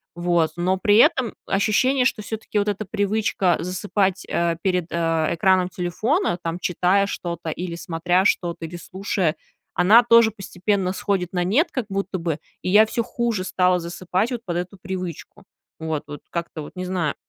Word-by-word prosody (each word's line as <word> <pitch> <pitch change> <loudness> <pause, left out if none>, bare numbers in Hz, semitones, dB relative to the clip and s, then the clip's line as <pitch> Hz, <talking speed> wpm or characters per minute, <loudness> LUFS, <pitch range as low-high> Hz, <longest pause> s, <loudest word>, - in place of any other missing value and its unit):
Вот, 175 -2 +1
но 185 +2 +1
при 205 +1 +3
этом 235 0 +4
ощущение, 250 +6 +2
что 225 - +1
все-таки 215 0 -3
вот 205 - 0
эта 205 +1 -3
привычка 205 -2 +1
засыпать, 190 +1 -1
э, 170 -1 +1
перед, 180 -3 0
э, - - -3 0.4
экраном 185 +1 +3
телефона, 185 - 0
там, 165 +1 -3
читая 185 +3 +2
что-то, 170 -4 -4
или 175 +2 -4
смотря 175 +2 0
что-то, 170 -4 0
или 165 +2 -8
слушая, 185 -2 -2 0.4
она 210 +7 +7
тоже 230 -1 +6
постепенно 195 -1 -2
сходит 190 -3 -2
на 180 -1 +1
нет 250 - +2
как 255 -5 -2
будто 195 -1 -2
бы, 165 -3 -2 0.2
и - - -2
я 210 +3 +7
всё 230 +1 -2
хуже 235 -5 -2
стала 180 -1 +2
засыпать 180 +6 -2
вот 245 - -2
под 175 -2 -3
эту 180 +2 -5
привычку. 185 +1 -6 0.4
Вот, 160 -2 -3
вот, 145 -1 -8
как-то 170 -2 -4
вот, - - -10
не 185 - -3
знаю. 180 -5 -1
185 Hz, 170 wpm, -23 LUFS, 175-205 Hz, 0.4 s, она